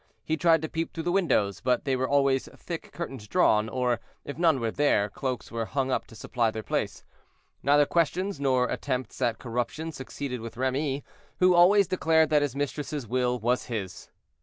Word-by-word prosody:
He 160 - 0
tried 165 0 +3
to - - -1
peep 165 +1 -3
through 165 - -5
the 175 - 0
windows, 140 - +1
but 125 -1 +1
there 130 -2 0
were 130 - 0
always 140 -2 +2
thick 170 -2 -7
curtains 135 -10 -6
drawn, 105 +2 +3
or 125 -1 0 0.3
if 145 - -6
none 165 -4 +3
were 115 -2 -1
there, 110 -8 +2
cloaks 130 +4 -4
were 115 -1 -2
hung 135 -1 -1
up - - -1
to 115 - -14
supply 115 +1 0
their 110 0 -5
place. - - -2 0.6
Neither 145 +1 +4
questions, 175 +3 0
nor 130 -3 +2
attempts 130 -2 -3
at 120 -3 +1
corruption, 125 +7 -3
succeeded 130 -3 -6
with 115 0 -8
Remy, 135 +2 -1 0.3
who 180 0 +5
always 190 +4 +6
declared 160 -3 +2
that 150 -1 +4
his 145 -3 -1
mistress's 145 -1 -3
will 125 +1 0
was 120 +2 0
his. 100 -6 -5
135 Hz, 185 wpm, -27 LUFS, 125-160 Hz, 0.6 s, always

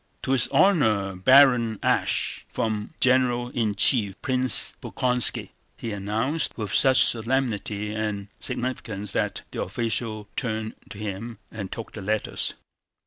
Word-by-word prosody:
"To - - -2
his 130 -3 +3
Honor 110 - +2
Baron 120 +1 +5
Asch, - - 0
from 110 +5 -3
General 125 -1 +2
in 110 -4 -1
Chief 100 -2 +4
Prince 130 0 +2
Bolkónski," 125 -1 +1 0.3
he 115 - -5
announced 110 +10 -2
with 105 -4 -4
such 130 -1 +6
solemnity 110 -4 -1
and 105 -2 -3
significance 110 -5 -3
that - - -2
the - - -4
official 110 -2 -3
turned 110 -3 -3 0.2
to - - -9
him 105 +2 -6
and 100 -3 -7
took 115 - -7
the 105 - -7
letters. 105 +2 -2
110 Hz, 130 wpm, -24 LUFS, 105-125 Hz, 0.3 s, such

